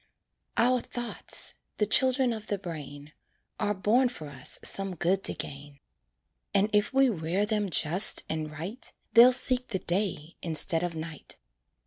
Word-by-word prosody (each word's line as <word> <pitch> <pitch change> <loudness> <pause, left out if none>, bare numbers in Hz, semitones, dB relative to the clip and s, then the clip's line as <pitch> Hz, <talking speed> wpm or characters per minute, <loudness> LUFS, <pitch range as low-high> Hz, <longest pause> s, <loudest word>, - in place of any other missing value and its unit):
Our 250 +2 +3
thoughts 240 0 +2 0.2
the 210 - +1
children 255 +3 +2
of 215 -1 -8
the 205 - -2
brain 150 -5 -9 0.5
Are 205 0 -1
born 235 +7 +2
for 155 -11 -9
us 130 -2 -2
some 195 -2 -1
good 180 +4 0
to - - +4
gain, 140 0 -9 0.8
And 205 +2 +2
if 210 0 +2
we 270 0 +3
rear 185 -1 -1
them 210 -2 -2
just 175 +5 +4
and 155 -1 -4
right, 170 - -8 0.2
They'll 240 +2 +8
seek 250 0 +1
the 200 - -3
day 175 -4 -2
instead 165 0 +3
of 175 -2 -4
night. 160 -1 -7
195 Hz, 150 wpm, -27 LUFS, 160-230 Hz, 0.8 s, They'll